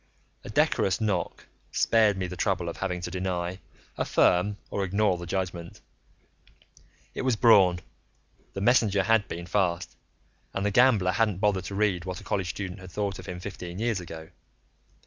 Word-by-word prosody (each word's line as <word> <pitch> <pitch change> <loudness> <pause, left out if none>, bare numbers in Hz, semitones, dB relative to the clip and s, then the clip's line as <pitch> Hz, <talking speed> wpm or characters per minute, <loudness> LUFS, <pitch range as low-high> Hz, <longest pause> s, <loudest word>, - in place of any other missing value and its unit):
A - - -9
decorous 95 - +2
knock 105 -6 -2 0.3
spared 110 -3 +3
me 95 - -2
the 90 0 -6
trouble 90 -3 0
of - - -7
having 90 -2 -3
to 90 - -5
deny, 90 0 -3 0.4
affirm 100 +3 +2
or 100 - -1
ignore 100 0 +1
the 85 - -7
judgment. 90 -2 -4 1.3
It - - -4
was 130 -2 +1
Braun; 95 -6 +5 0.7
the 100 - -5
messenger 105 -3 +3
had 110 0 +3
been 85 +1 -6
fast, 90 -2 -1 0.6
and 100 - -1
the 105 - +1
gambler 110 -5 +4
hadn't 105 -2 +1
bothered 95 -2 +1
to 100 - -5
read 100 -4 +1
what 90 -1 -5
a - - -13
college 95 -3 -2
student 95 +1 -5
had 95 -1 -10
thought 100 +1 -3
of - - -10
him 90 -1 -5
fifteen 90 -2 -7
years 115 -1 0
ago. 80 -2 -9
95 Hz, 165 wpm, -27 LUFS, 90-105 Hz, 1.3 s, Braun